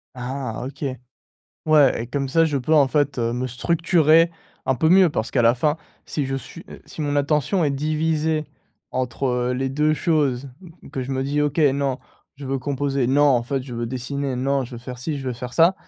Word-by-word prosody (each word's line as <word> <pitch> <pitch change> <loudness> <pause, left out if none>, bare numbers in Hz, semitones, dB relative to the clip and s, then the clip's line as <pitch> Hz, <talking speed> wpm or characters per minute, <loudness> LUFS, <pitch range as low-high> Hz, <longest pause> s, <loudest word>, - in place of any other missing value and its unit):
Ah 130 -2 -4
OK. 140 +3 -8 0.8
Ouais 150 -6 +4
et - - -6
comme 135 +2 -2
ça 165 +5 +3
je 150 -3 0
peux, 145 +5 +1
en 145 -3 +5
fait, 145 -1 0
heu, 115 -1 0
me 125 +1 -2
structurer 165 +4 +3 0.4
un 130 - +2
peu 160 +5 +2
mieux 185 +1 +6
parce 115 -7 -3
qu'à 130 - +1
la 115 +1 +5
fin 150 +5 +1 0.3
si 145 -3 -3
je 135 0 -2
suis 135 - -9
heu, - - -11
si - - -10
mon 145 -1 -1
attention 150 +5 +1
est 145 - +1
divisée 155 +2 0 0.5
entre 125 0 -1
les 135 +1 -1
2 150 +3 +2
choses, 145 -6 +1 0.2
m 180 - -12
m - - -12
que 130 - -3
je 130 - -6
me 130 0 -1
dis: 145 +2 0
«OK. 150 +1 -1
Non, 140 -3 +2 0.4
je 140 0 -8
veux 135 +1 -1
composer! 140 -1 -1
Non, 140 +3 +4
en 130 -5 +4
fait, 135 +2 -2
je 125 -2 -8
veux 120 0 -3
dessiner! 130 +2 -3
Non, 135 +1 0
je 125 - -12
veux 120 - -6
faire 125 +1 -8
ci, 145 +4 -3
je 135 - -7
veux - - -1
faire 125 +1 -7
ça!» 170 +3 +5
140 Hz, 225 wpm, -22 LUFS, 125-150 Hz, 0.8 s, mieux